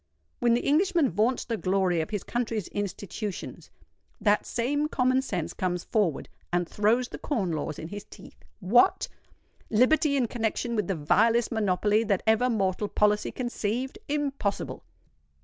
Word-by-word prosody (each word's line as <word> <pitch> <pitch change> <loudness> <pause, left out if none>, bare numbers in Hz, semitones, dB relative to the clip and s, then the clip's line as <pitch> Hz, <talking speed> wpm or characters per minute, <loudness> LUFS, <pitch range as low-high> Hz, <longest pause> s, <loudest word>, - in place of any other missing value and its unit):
When 240 -1 +3
the 240 - -2
Englishman 330 - +3
vaunts 220 +8 +1
the 230 -2 -2
glory 185 -3 +1
of 160 - -4
his 205 -3 -3
country's 230 -5 -2
institutions, 205 0 -5 0.5
that 210 -1 +2
same 285 +5 0
Common 255 -2 +2
Sense 185 -11 -3
comes 180 -1 -2
forward 200 - 0 0.2
and 175 -1 0
throws 225 +6 +1
the - - -8
Corn 205 - -1
Laws 155 -1 -3
in 160 - -7
his 205 +1 -7
teeth. - - -15 0.2
What! 240 - +4 0.6
liberty 280 +6 +3
in 255 - +2
connexion 235 +1 -2
with 210 - 0
the 195 - 0
vilest 225 +10 +2
monopoly 210 0 +2
that 200 -3 0
ever 220 +3 +3
mortal 200 -2 0
policy 210 +1 +1
conceived? 245 +1 -3
Impossible! 280 -8 -2
215 Hz, 150 wpm, -27 LUFS, 195-250 Hz, 0.6 s, What